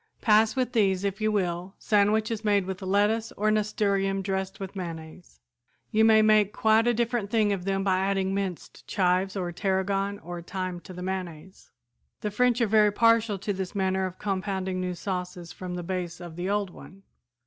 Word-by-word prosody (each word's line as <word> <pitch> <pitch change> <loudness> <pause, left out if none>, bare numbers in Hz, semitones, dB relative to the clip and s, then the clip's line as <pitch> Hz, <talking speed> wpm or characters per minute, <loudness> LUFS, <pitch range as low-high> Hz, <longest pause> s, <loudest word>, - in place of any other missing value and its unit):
"Pass 220 +1 +4
with 255 -2 0
these, 195 -5 +2
if 200 +2 -2
you 215 0 +2
will, 180 -2 -2
sandwiches 215 +1 +1
made 205 -3 +2
with 190 +1 -5
lettuce 205 +4 +1
or 215 +1 +1
nasturtium 200 -2 0
dressed 190 0 -3
with 195 0 -7
mayonnaise. 165 - -8 0.5
You 220 +1 +3
may 220 -1 +6
make 215 -1 +4
quite 220 +1 +3
a 240 - +4
different 235 -3 -1
thing 215 -2 +2
of 185 -2 -4
them 195 0 0
by 190 -1 +2
adding 195 0 0
minced 195 -3 -5
chives 185 0 +1
or 180 -3 -2
tarragon, 195 +2 -1
or 175 -1 -7
thyme, 185 0 -4
to 185 - -9
the 180 0 -7
mayonnaise. 185 -2 -6 0.5
The 210 - -2
French 245 +3 +2
are - - +5
very 210 0 +4
partial 230 -1 +3
to 200 +2 -3
this 190 +1 -5
manner 190 -1 0
of 185 0 -10
compounding 190 -2 -2
new 180 -1 -3
sauces 180 -2 -5
from 180 -1 -6
the 175 - -4
base 175 -1 -4
of 175 -3 -9
the 175 +2 -3
old 205 -2 0
one. 195 +2 -14
195 Hz, 185 wpm, -27 LUFS, 185-210 Hz, 0.5 s, may